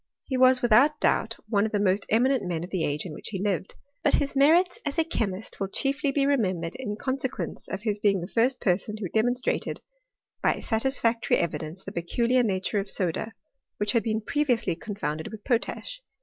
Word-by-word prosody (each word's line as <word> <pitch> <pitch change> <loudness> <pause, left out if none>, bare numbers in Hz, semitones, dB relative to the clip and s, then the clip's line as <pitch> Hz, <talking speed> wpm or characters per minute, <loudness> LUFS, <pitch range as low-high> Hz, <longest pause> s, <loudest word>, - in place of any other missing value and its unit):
He 265 - -3
was 255 0 +5
without 270 +7 +5
doubt - - +1
one 205 -3 +2
of 220 - -1
the 210 - 0
most 200 0 +1
eminent 255 +4 +3
men 175 -2 -2
of 180 - -8
the 185 -4 -1
age 150 +3 -2
in 170 - -6
which - - -9
he 195 - -4
lived; 195 -1 -2 0.3
but - - +6
his 280 0 -1
merits 335 +6 +4
as 290 +1 -3
a 325 - +4
che 275 -9 -1
mist 195 +3 -7
will 195 - -1
chiefly 275 +6 0
be 275 0 +1
remembered 185 -12 0
in 225 -6 -4
consequence 260 +3 -4
of 190 - -4
hii 210 -2 -1
being 200 -2 +3
the 175 - -5
first 245 +5 +2
person 205 +3 0
who 205 -3 -4
demonstrated 245 +5 0 0.6
by - - +3
satisfac 230 -1 +1
tory - - +2
evidence 170 +1 -3
the 195 - -7
peculiar 235 +8 +1
nature 200 -2 0
of 195 0 -4
soda, 190 +5 -2 0.4
which 205 0 0
had 230 - +2
been 220 -1 -1
previously 240 - 0
confounded 165 -6 -4
with 220 -2 -9
potash. 280 - -2
220 Hz, 200 wpm, -26 LUFS, 190-260 Hz, 0.6 s, but